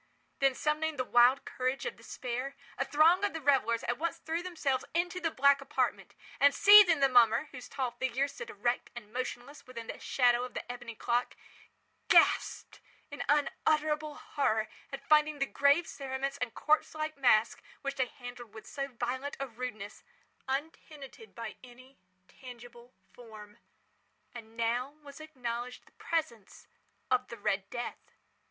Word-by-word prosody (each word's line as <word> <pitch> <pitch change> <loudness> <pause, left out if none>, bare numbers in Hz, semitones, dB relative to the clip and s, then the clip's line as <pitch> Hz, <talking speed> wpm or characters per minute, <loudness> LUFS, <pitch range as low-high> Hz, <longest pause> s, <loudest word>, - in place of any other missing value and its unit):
Then, 275 -1 +3
summoning 305 +2 -1
the 255 - 0
wild 245 +2 +4
courage 255 +1 -2
of 480 - -3
despair, 255 +2 -5 0.2
a - - 0
throng 325 +7 +4
of 405 - 0
the 325 - -4
revellers 260 -6 +2
at 240 +2 -2
once 335 +1 -2
threw 325 +1 -3
themselves 315 -8 -1
into 350 +1 0
the 335 -2 0
black 280 -1 +4
apartment, 275 +3 -2 0.2
and, 285 0 +5
seizing 400 -7 +8
the 275 - +6
mummer, 245 +2 +4
whose 255 -2 -10
tall 260 -3 -2
figure 260 +3 -1
stood 470 +12 -9
erect 245 - -2
and 215 -3 -10
motionless 255 +3 -6
within 235 -3 -8
the - - -7
shadow 245 -2 +2
of 250 - -8
the - - -5
ebony 245 -2 -8
clock, 240 +3 -1 0.7
gasped - - +3 0.3
in 285 - -6
unutterable 300 +1 +1
horror 220 -7 -1 0.2
at 275 0 -7
finding 305 0 +4
the 275 - +1
grave 285 +5 +3
cerements 275 -1 -4
and 250 -2 -3
corpse 310 0 +1
like 310 0 -3
mask, 240 -5 +3 0.2
which 275 0 -2
they 260 -1 +1
handled 245 -3 -11
with 220 - -10
so 275 -1 -4
violent 260 +2 -4
a 275 - -2
rudeness, 225 -4 -7 0.5
untenanted 295 - -6
by 230 -2 -7
any 255 +2 -15 0.3
tangible 245 -1 -13 0.2
form. 215 -3 -13 0.7
And 225 -1 -11
now 240 +5 -1
was 285 +1 -11
acknowledged 250 -5 -6
the - - -23
presence 240 - -4 0.5
of 255 0 +2
the 235 - -9
Red 195 -1 -1
Death. 240 -1 -5
265 Hz, 155 wpm, -31 LUFS, 240-300 Hz, 0.7 s, seizing